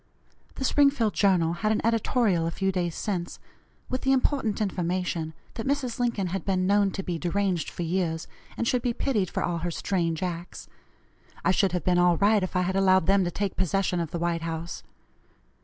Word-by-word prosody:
The 265 - -3
Springfield 275 -6 +3
Journal 180 -5 +3
had 215 +5 0
an 220 - 0
editorial 225 -6 +2
a - - 0
few 190 +3 -1
days 175 -3 -2
since, 180 -4 -3 0.5
with 255 - -2
the 270 - +3
important 260 -5 +1
information 175 -4 -2 0.2
that 225 - -5
Mrs. 270 -4 -1
Lincoln 235 -5 0
had 195 - -2
been 185 -2 0
known 200 +1 +3
to 195 - -4
be 175 -3 -3
deranged 180 -1 0
for 175 - -5
years, 165 -1 -1 0.3
and 235 - -1
should 250 0 +2
be 240 -1 -1
pitied 215 -10 0
for - - -2
all 170 -1 -1
her 175 +2 -2
strange 170 -1 -1
acts. 175 -1 -5 0.8
I - - +5
should 190 -1 +2
have 180 -4 -1
been 180 -1 +3
all 175 -1 +4
right 205 +2 +4
if 185 0 -4
I 180 - +3
had 190 +1 -1
allowed 190 -2 +4
them 195 +1 +4
to - - 0
take 195 +2 -3
possession 185 0 0
of 165 -2 -2
the 170 - -4
White 170 0 -1
House. 165 +1 -5
185 Hz, 200 wpm, -26 LUFS, 175-210 Hz, 0.8 s, I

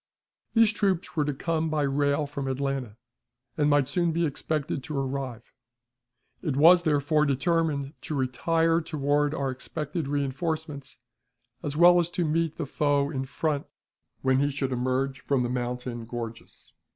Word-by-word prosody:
These 225 -1 +5
troops 195 -5 0
were 150 -2 +2
to 145 - -1
come 160 +2 -1
by 155 -1 0
rail 140 +1 +1
from 140 -1 -5
Atlanta, 135 -4 -2 0.6
and 150 -1 +2
might 145 -2 +3
soon 170 +3 +1
be 170 +1 +1
expected 145 -1 -2
to 150 -2 -4
arrive. 135 -3 -3 1.0
It 150 -7 -1
was, 170 +4 +7
therefore, 150 -1 +2
determined 140 0 0
to 155 - -4
retire 165 +6 +1
toward 145 -1 0
our 135 -1 -1
expected 150 +5 -4
reënforcements, 145 +1 -3 0.6
as 145 0 -4
well 175 +1 +7
as 170 -1 0
to 175 - +2
meet 160 0 0
the 160 - -2
foe 145 0 +1
in 135 -3 -3
front 145 +2 -2 0.6
when 130 0 +3
he 145 +1 +2
should 135 -1 -2
emerge 130 +2 -1
from 135 -3 0
the 120 - -1
mountain 125 -1 -3
gorges. 115 -1 -8
145 Hz, 150 wpm, -27 LUFS, 135-160 Hz, 1.0 s, was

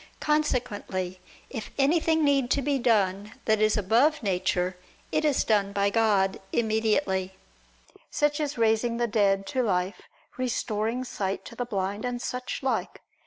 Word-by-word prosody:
Consequently 215 -11 -1 0.3
if 225 -5 -5
anything 320 +3 +3
need 275 -3 +2
to 280 +1 +1
be 280 -1 +1
done 205 -3 +1
that 220 -1 +2
is 215 0 +3
above 235 +9 +3
nature, 185 -2 0 0.4
it - - +1
is 295 -3 +2
done 205 -3 +2
by 200 0 +1
God 200 -4 +2
immediately; 215 -4 0 0.7
such 295 0 +1
as 290 -3 -2
raising 230 +1 +2
the 240 - +1
dead 200 -3 +2
to 260 +5 -1
life, 185 -4 -1 0.4
restoring 230 -1 -1
sight 195 -6 -3
to - - -10
the 245 - -3
blind, 200 -1 -3
and 245 -1 -2
such 250 +2 -4
like. 265 - -2
220 Hz, 145 wpm, -27 LUFS, 200-255 Hz, 0.7 s, anything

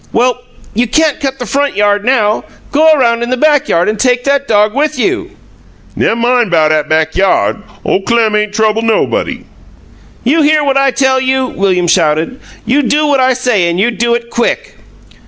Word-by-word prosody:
"Well, 250 +1 +1 0.3
you 240 +3 0
can't 310 +5 +1
cut 270 -1 -3
the 245 - -5
front 280 +4 -1
yard 205 0 +1
now. 220 -4 +1 0.3
Go 315 +2 +4
around 235 -6 +2
in 240 - -3
the 255 - -1
back 295 +1 +2
yard 170 +3 +1
and 215 0 -2
take 245 0 +1
that 280 +1 0
dog 210 0 +2
with 295 +2 -1
you." 375 +8 -2 0.6
"Nemmine 240 0 +1
'bout 160 -3 +2
'at 155 -1 0
back 160 0 0
yod! 195 +3 +1 0.2
Ole - - 0
Clem 225 0 +1
ain' 210 0 0
trouble 220 +1 0
nobody." 225 -1 -1 0.8
"You 300 +7 +2
hear 305 0 +2
what 275 -1 0
I 275 0 +3
tell 265 0 +1
you?" 260 0 0
William 190 -6 -1
shouted. 165 +7 0 0.3
"You 275 +4 +2
do 300 +3 +1
what 285 -2 +1
I 260 0 +3
say 240 -8 0
and 170 +1 -2
you 235 +5 +2
do 235 +1 0
it 235 0 -6
quick!" 475 - -2
240 Hz, 190 wpm, -12 LUFS, 210-275 Hz, 0.8 s, Go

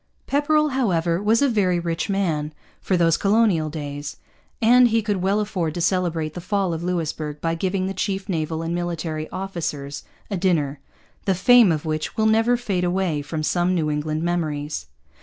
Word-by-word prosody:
Pepperrell, 300 +2 +2
however, 180 - 0
was 225 +5 +3
a - - +5
very 190 -7 +2
rich 170 +3 -2
man, 160 -6 -1 0.3
for 185 - +1
those 165 -1 +3
colonial 200 -7 +2
days; 145 -1 -6 0.4
and 245 +2 +6
he 225 -1 +1
could 205 -2 0
well 195 +3 +1
afford 180 -7 -2
to - - -3
celebrate 170 -3 0
the 175 - -6
fall 195 -1 0
of 160 - -4
Louisbourg 160 -4 -3
by 165 +1 -1
giving 185 +2 -1
the 190 - -2
chief 195 +1 -2
naval 160 -3 -2
and 165 +1 -2
military 165 -3 -3
officers 160 -7 -4 0.3
a 200 - 0
dinner, 155 -6 0 0.5
the 195 - +2
fame 240 +1 +6
of 155 0 -2
which 155 -1 -3
will 220 - +2
never 225 +3 +3
fade 200 -7 -2
away 175 -4 0
from 155 +2 -4
some 175 +3 +1
New 155 -3 0
England 155 +1 -2
memories. 150 - -2
175 Hz, 175 wpm, -23 LUFS, 155-200 Hz, 0.5 s, and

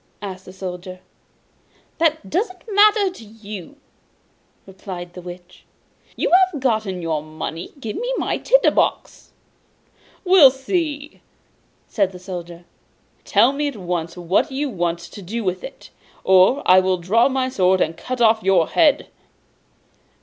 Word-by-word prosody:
asked 190 -2 -8
the - - -11
Soldier. 185 -1 -7 1.0
'That 315 -9 +1
doesn't 370 - -3
matter 410 -1 +4
to 360 - -13
you,' 215 - -10 0.9
replied 185 -2 -9
the 180 - -9
Witch. 175 0 -12 0.5
'You - - -1
have 365 -3 +4
got 220 -5 0
your 165 -5 -3
money, 155 +2 -7
give 225 -5 -5
me - - -3
my - - -1
tinder - - +3
box.' - - -1 1.0
'We'll 360 -7 +8
see!' 290 +2 -4 0.7
said 195 -3 0
the - - -9
Soldier. 175 -2 -8 0.6
'Tell 250 - +4
me 295 +1 -1
at 285 - -5
once 175 -2 -4
what 175 +1 0
you 275 +1 -2
want 175 -4 -1
to 170 +4 -11
do 220 +6 -5
with 185 -1 -2
it, - - -11 0.3
or 190 +9 +4
I 185 +1 +7
will 185 0 +1
draw 210 +9 +2
my 260 -1 -1
sword, 190 -7 +2
and 165 - 0
cut 250 +7 -5
off 220 -1 +4
your 185 -4 +2
head! 300 -3 +3
200 Hz, 140 wpm, -21 LUFS, 180-280 Hz, 1.0 s, We'll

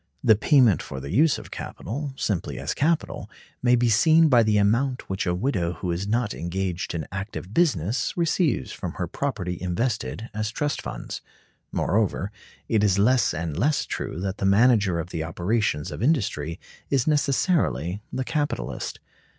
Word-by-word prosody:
The 115 -4 +6
payment 120 - +4
for 65 - -7
the 70 +1 -6
use 155 +2 +4
of - - -11
capital, 140 - -5
simply 95 -5 -2
as - - -2
capital, 160 +2 0 0.3
may 125 0 +4
be 120 0 +2
seen 155 +8 +5
by 120 -4 +6
the 110 -2 +3
amount 120 +6 +1
which 95 0 -2
a 90 - +1
widow 90 -5 0
who 90 +2 -3
is 90 +4 -2
not 110 0 0
engaged 90 +1 -3
in 80 -3 -3
active 100 0 -6
business 120 - +1
receives 165 - +1
from - - -5
her - - -3
property 90 -12 -3
invested 110 +4 -2
as 110 0 -2
trust 145 +6 -2
funds. - - -6 0.5
Moreover, 100 0 0 0.4
it 110 -2 +2
is 100 -2 +3
less 120 +4 +4
and 80 -1 -3
less 140 - +1
true - - -4
that 95 0 -3
the - - -3
manager 105 -3 +4
of 85 +2 -5
the 80 - -2
operations 85 0 -1
of - - -6
industry 100 - 0 0.3
is 135 -3 +2
necessarily 135 - +1
the 130 - -2
capitalist. 145 +2 -3
105 Hz, 165 wpm, -25 LUFS, 90-130 Hz, 0.5 s, The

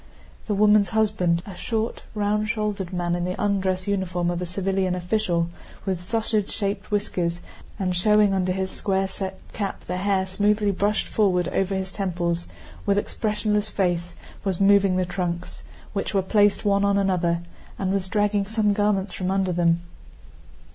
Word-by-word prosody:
The 210 - 0
woman's 210 0 +5
husband, 205 -6 +1
a 195 - -8
short, 225 +4 -2
round 210 +1 0
shouldered 210 -5 -2
man 175 -1 -1
in 175 0 -1
the 180 +1 -3
undress 190 -2 0
uniform 180 -3 0
of 175 0 -3
a 180 - -3
civilian 190 0 0
official, 175 -2 0 0.4
with 185 -1 -3
sausage 220 -2 0
shaped 200 -1 -2
whiskers 180 -5 -1 0.4
and 185 -2 -1
showing 210 +2 +4
under 185 -1 +1
his 190 0 -2
square 195 -1 0
set 190 0 -5 0.2
cap 200 -3 -4
the 180 - -3
hair 190 0 +1
smoothly 205 +2 +2
brushed 205 +2 +1
forward 180 -4 +2
over 195 0 0
his 190 0 -3
temples, 175 -3 -2 0.4
with 200 0 +2
expressionless 210 0 0
face 175 -4 -1 0.3
was 190 -3 -1
moving 195 -1 +5
the 185 0 +1
trunks, 175 -1 -4 0.3
which 200 0 -2
were 195 - +3
placed 205 +2 +3
one 200 -1 +3
on 200 0 +3
another, 180 -3 +1 0.4
and 190 -1 -1
was 195 -1 0
dragging 205 0 +1
some 215 -1 +2
garments 205 -2 +1
from 185 -1 -2
under 190 -1 +1
them. 170 -1 +2
195 Hz, 160 wpm, -24 LUFS, 180-205 Hz, 0.4 s, woman's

